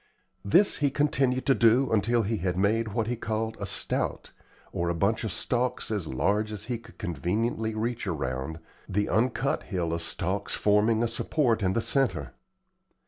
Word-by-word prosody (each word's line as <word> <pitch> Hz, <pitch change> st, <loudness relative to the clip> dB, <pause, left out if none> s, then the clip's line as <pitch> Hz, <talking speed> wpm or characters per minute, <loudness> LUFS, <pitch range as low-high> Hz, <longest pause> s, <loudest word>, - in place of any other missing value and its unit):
This 185 Hz, -, +4 dB
he 145 Hz, -2 st, +2 dB
continued 135 Hz, -3 st, +1 dB
to 135 Hz, -, +5 dB
do 120 Hz, +2 st, +4 dB
until 115 Hz, +2 st, +2 dB
he 110 Hz, +2 st, -1 dB
had 90 Hz, -1 st, -2 dB
made 110 Hz, +4 st, +2 dB
what 110 Hz, +1 st, -1 dB
he 120 Hz, +2 st, -2 dB
called 110 Hz, 0 st, -3 dB
a -, -, -3 dB
"stout," -, -, -1 dB, 0.4 s
or 85 Hz, 0 st, -1 dB
a 85 Hz, -, 0 dB
bunch 100 Hz, +7 st, +1 dB
of 110 Hz, -, -2 dB
stalks 125 Hz, +1 st, -1 dB
as 100 Hz, -7 st, -2 dB
large 105 Hz, +11 st, 0 dB
as 105 Hz, -2 st, -4 dB
he 120 Hz, -2 st, -3 dB
could 115 Hz, 0 st, -17 dB
conveniently 110 Hz, -, -2 dB
reach 115 Hz, 0 st, -2 dB
around, 75 Hz, -2 st, -3 dB, 0.3 s
the 105 Hz, +2 st, 0 dB
uncut 125 Hz, +5 st, +1 dB
hill 85 Hz, -5 st, -2 dB
of 85 Hz, -, -2 dB
stalks 95 Hz, +4 st, -1 dB
forming 105 Hz, +2 st, +3 dB
a -, -, +2 dB
support 115 Hz, 0 st, 0 dB
in 95 Hz, -1 st, +1 dB
the 115 Hz, -, +1 dB
centre. 105 Hz, -, 0 dB
110 Hz, 175 wpm, -27 LUFS, 95-120 Hz, 0.4 s, to